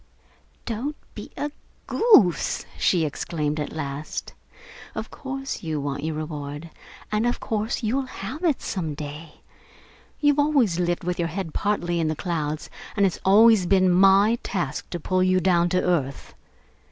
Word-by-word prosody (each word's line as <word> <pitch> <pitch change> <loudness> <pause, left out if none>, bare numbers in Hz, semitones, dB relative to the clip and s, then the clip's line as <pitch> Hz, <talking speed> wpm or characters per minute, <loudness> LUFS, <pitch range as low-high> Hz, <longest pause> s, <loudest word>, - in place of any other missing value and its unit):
"Don't 245 +6 -3 0.2
be - - -8
a 295 0 -2 0.3
goose!" 410 - +4
she 170 -4 +3
exclaimed 150 0 -2
at 150 - -3
last. 145 -1 -5 0.6
"Of - - -5
course 270 0 -5
you 160 -3 -2
want 140 0 -3
your 160 0 -2
reward, 150 0 -6 0.4
and 215 +3 +1
of 240 - -1
course 220 +3 -2
you'll 260 +5 0
have 255 - -7
it, 320 -6 +1
some 160 -6 -3
day! 150 +2 -8 0.8
You've 290 -1 +3
always 275 - +3
lived 175 -1 0
with 180 0 -2
your 170 - +1
head 165 -1 -5
partly 175 -5 0
in 160 - +1
the 155 - -1
clouds, 155 -3 -3 0.3
and 200 - +4
it's 185 - -1
always 210 -1 +6
been 185 -1 +4
my 195 +5 +5
task 165 -7 -3
to 175 - -4
pull 185 +3 0
you 185 0 +3
down 175 -1 +3
to 180 +1 +1
earth. 145 -7 -1
180 Hz, 155 wpm, -24 LUFS, 155-215 Hz, 0.8 s, always